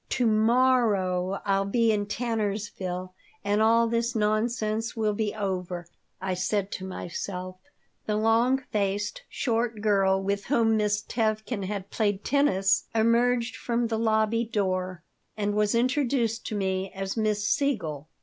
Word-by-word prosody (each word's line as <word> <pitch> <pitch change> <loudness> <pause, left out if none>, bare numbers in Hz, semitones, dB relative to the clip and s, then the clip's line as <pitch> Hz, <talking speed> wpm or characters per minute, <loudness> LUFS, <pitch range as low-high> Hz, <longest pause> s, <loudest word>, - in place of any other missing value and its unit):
"To 250 - +1
morrow 215 -5 +2
I'll 195 -1 +2
be 230 +1 +3
in 205 -1 0
Tannersville 205 -5 -3 0.3
and 205 +1 +1
all 230 +1 +4
this 235 +1 -1
nonsense 220 +1 0
will 215 -2 +1
be 210 0 -2
over," 180 -4 -3 0.3
I 190 0 -2
said 195 +2 -1
to 190 - -5
myself 185 0 -5 0.5
The 210 - +1
long 225 +4 +3
faced, 205 0 -1
short 230 -3 -1
girl 195 -2 +3
with 200 +1 -2
whom 230 -5 +3
Miss 210 -1 +1
Tevkin 215 -2 -1
had 195 0 -5
played 205 -2 0
tennis 195 -9 +2
emerged 235 +1 +2
from 235 0 -1
the 225 -1 -1
lobby 220 0 +2
door 185 -5 -2 0.3
and 205 -1 0
was 210 +1 +1
introduced 245 -2 +1
to 215 - -3
me 190 -1 -1
as 195 0 -3
Miss 210 -2 0
Siegel. 165 - -1
210 Hz, 140 wpm, -27 LUFS, 195-230 Hz, 0.5 s, all